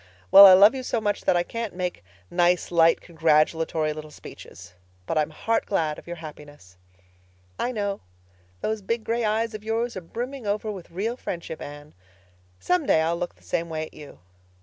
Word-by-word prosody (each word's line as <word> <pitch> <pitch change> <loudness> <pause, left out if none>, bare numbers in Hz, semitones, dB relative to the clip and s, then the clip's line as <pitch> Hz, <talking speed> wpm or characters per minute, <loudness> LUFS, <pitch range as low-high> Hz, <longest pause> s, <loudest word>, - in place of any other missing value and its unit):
Well, 200 0 +11
I 190 - +9
love 200 +5 +7
you 265 - -4
so 245 -2 -2
much 205 -2 -2
that 175 - +3
I 175 - +1
can't 230 0 -5
make 180 - -4 0.3
nice, 175 0 +2
light, 165 -1 +4
congratulatory 160 -1 +1
little 155 0 -9
speeches. 90 - -13 0.3
But - - -3
I'm 155 -1 +1
heart 225 +9 -1
glad 160 -6 -1
of - - -17
your 175 - -5
happiness." 145 - -12 0.8
"I 245 - -1
know. 205 -4 -3 0.6
Those 220 -1 -2
big 230 +3 -2
gray 230 +1 -1
eyes 220 +1 0
of 215 -1 -8
yours 230 +2 -2
are 185 - -5
brimming 240 +7 -6
over 210 +1 -1
with 190 -4 -9
real 215 +8 -3
friendship, 170 -7 -6
Anne. 145 +1 -10 0.7
Some 360 -5 0
day 160 - +4
I'll 165 +1 0
look 175 - -5
the 90 - -26
same 165 - -2
way 155 -1 -3
at - - -16
you. 150 -2 -12
175 Hz, 190 wpm, -25 LUFS, 155-220 Hz, 0.8 s, Well